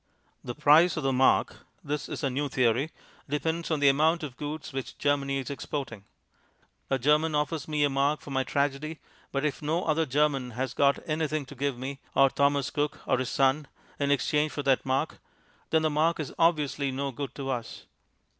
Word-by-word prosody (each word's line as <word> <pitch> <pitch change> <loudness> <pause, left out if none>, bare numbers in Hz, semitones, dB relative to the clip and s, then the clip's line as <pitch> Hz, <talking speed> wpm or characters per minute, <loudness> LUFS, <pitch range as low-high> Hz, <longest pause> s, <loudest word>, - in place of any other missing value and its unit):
The 120 - -5
price 155 +4 +5
of 155 - -2
the 135 0 +1
mark 130 +1 +3 0.3
(this 150 +1 -3
is - - -5
our 135 - +2
new 145 +3 -1
theory) 125 +3 +2 0.4
depends 160 +3 -1
on 155 -3 0
the 140 - +5
amount 155 +4 +3
of 140 -5 -6
goods 150 0 -6
which 135 -1 -5
Germany 140 -1 +1
is 135 0 -4
exporting. 130 -6 -5 0.8
A 135 - +2
German 150 +4 +2
offers 150 0 -1
me 150 -1 +1
a 145 - +3
mark 140 +2 +1
for 145 - -10
my 135 -1 +1
tragedy, 145 +3 -1 0.3
but 140 +1 -1
if 150 0 -2
no 160 +4 0
other 160 0 +1
German 135 -2 +1
has 130 -1 -2
got 140 +1 +2
anything 155 -2 -1
to 135 - -11
give 140 -1 -2
me, 135 +2 -5 0.2
or 135 -1 +5
Thomas 140 -1 +1
Cook 145 0 -2
or 130 - +1
his 130 - -2
Son, 135 +2 +2 0.3
in 140 -1 +1
exchange 150 +3 +2
for 145 - -3
that 135 -1 +2
mark, 130 +1 -1 0.5
then 160 -1 +2
the 155 - +3
mark 160 +3 +2
is 150 - -4
obviously 150 -4 +2
no 135 +1 -2
good 135 0 -6
to 135 -1 -3
us. 120 -3 -5
145 Hz, 195 wpm, -28 LUFS, 135-150 Hz, 0.8 s, price